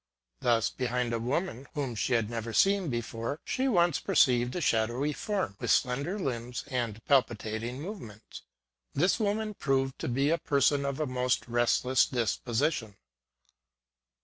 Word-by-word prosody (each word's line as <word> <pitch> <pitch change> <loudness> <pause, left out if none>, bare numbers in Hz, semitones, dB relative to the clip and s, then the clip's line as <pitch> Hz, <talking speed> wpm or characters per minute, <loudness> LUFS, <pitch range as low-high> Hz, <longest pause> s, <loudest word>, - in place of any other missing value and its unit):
Thus, 115 -2 +2
behind 125 -1 -1
a 115 - 0
woman 135 +2 -2
whom 140 -5 -2
she 115 +3 -1
had 115 -3 +2
never 115 0 -4
seen 195 - +3
before, 120 +3 -3
she 260 +1 0
once 175 - +3
perceived 120 -1 +3
a - - -1
shadowy 120 +2 +1
form, 195 - -2
with - - -3
slender 140 +9 +1
limbs 125 - -3
and 115 -4 -3
palpitating 120 -2 0
movements. 140 - -9 0.5
This 180 - +2
woman 215 0 -1
proved 135 -6 -1
to - - -3
be 135 +5 +1
a 165 - +2
person 140 -1 +2
of 140 0 -2
a 155 - +1
most 125 -1 0
restless 120 +2 +2
dis 120 -4 0
position. 120 -3 -1
130 Hz, 150 wpm, -29 LUFS, 120-150 Hz, 0.5 s, seen